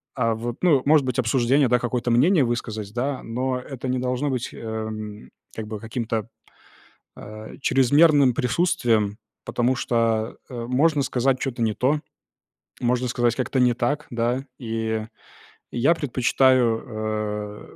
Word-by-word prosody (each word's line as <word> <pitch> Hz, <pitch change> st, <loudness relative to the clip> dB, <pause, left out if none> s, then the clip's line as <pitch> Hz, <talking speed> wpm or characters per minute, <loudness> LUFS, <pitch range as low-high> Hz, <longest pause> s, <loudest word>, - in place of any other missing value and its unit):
а, 115 Hz, 0 st, +1 dB
вот, 120 Hz, +1 st, -5 dB
ну, 150 Hz, -8 st, +5 dB
может 150 Hz, -1 st, +5 dB
быть, 125 Hz, -1 st, -1 dB
обсуждение, 130 Hz, +3 st, +3 dB
да, 125 Hz, 0 st, +3 dB
какое-то 120 Hz, 0 st, -1 dB
мнение 145 Hz, +6 st, +4 dB
высказать, 110 Hz, -3 st, -4 dB
да, 130 Hz, +2 st, -2 dB
но 125 Hz, +2 st, -2 dB
это 130 Hz, 0 st, -7 dB
не 125 Hz, 0 st, 0 dB
должно 125 Hz, +3 st, -1 dB
быть, 125 Hz, -2 st, -2 dB
эм, 110 Hz, -1 st, -6 dB, 0.3 s
как 110 Hz, -1 st, -5 dB
бы, 105 Hz, -1 st, -5 dB
каким-то, 115 Hz, 0 st, -3 dB, 0.9 s
а, 110 Hz, +1 st, -10 dB
чрезмерным 140 Hz, +1 st, +5 dB
присутствием, 120 Hz, -, +1 dB, 0.3 s
потому 125 Hz, +2 st, +1 dB
что, 115 Hz, -2 st, 0 dB
э, 120 Hz, -2 st, -5 dB
можно 145 Hz, +3 st, +2 dB
сказать 130 Hz, 0 st, +1 dB
чё-то 130 Hz, -3 st, -3 dB
не 110 Hz, -1 st, +1 dB
то, 140 Hz, +7 st, +1 dB, 0.8 s
можно 125 Hz, +1 st, +1 dB
сказать 120 Hz, 0 st, +1 dB
как-то 130 Hz, +1 st, -1 dB
не 125 Hz, -1 st, +4 dB
так, 145 Hz, +5 st, -1 dB
да. 120 Hz, +3 st, -1 dB
И 110 Hz, -2 st, -3 dB, 0.6 s
я 135 Hz, +8 st, +3 dB
предпочитаю, 110 Hz, -6 st, 0 dB
120 Hz, 135 wpm, -24 LUFS, 115-130 Hz, 0.9 s, ну